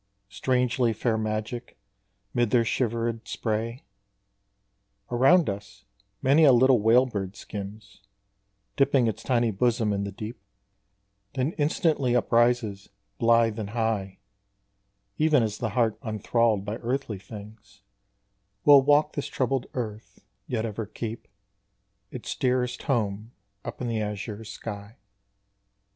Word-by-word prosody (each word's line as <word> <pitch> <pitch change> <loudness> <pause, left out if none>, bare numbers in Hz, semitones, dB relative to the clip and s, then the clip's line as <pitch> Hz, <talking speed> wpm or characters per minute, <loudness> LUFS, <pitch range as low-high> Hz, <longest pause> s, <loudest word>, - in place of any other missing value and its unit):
Strangely 125 0 +1
fair 110 +1 0
magic, 110 +2 -4 0.6
mid 120 -2 +2
their 120 -1 +3
shivered 115 0 -1
spray, 115 +5 -3 1.3
Around 135 +8 +5
us 100 0 -6 0.4
many 140 +5 +5
a 145 - +8
little 130 0 +5
whale 115 +4 +5
bird 100 -5 -4
skims, 100 0 -9 0.7
Dipping 140 -2 +3
its 110 - -2
tiny 120 -3 +1
bosom 110 +1 +1
in 100 0 -1
the 100 - -4
deep, 110 +3 -8 0.9
Then 135 +3 0
instantly 145 -4 +1
uprises 120 -4 +1 0.3
blithe 115 -1 +3
and 105 -2 -4
high, 110 -4 -2 1.0
Even 155 -5 +4
as 110 -1 -3
the 110 - -1
heart 115 -3 +2
unthralled 110 -2 0
by 105 +2 -3
earthly 120 -4 -3
things 100 -1 -12 0.8
Will 145 -2 +9
walk 145 +2 +3
this 145 - -3
troubled 130 -1 -1
earth 110 -4 -6 0.2
yet 115 -2 -1
ever 110 -1 -4
keep 115 +1 -6 0.8
Its - - -5
dearest 125 -1 0
home 110 -2 -1 0.3
up - - -7
in 125 - -2
the 115 -2 -1
azure 105 +1 -5
sky. 105 0 -8
115 Hz, 120 wpm, -26 LUFS, 105-125 Hz, 1.3 s, Will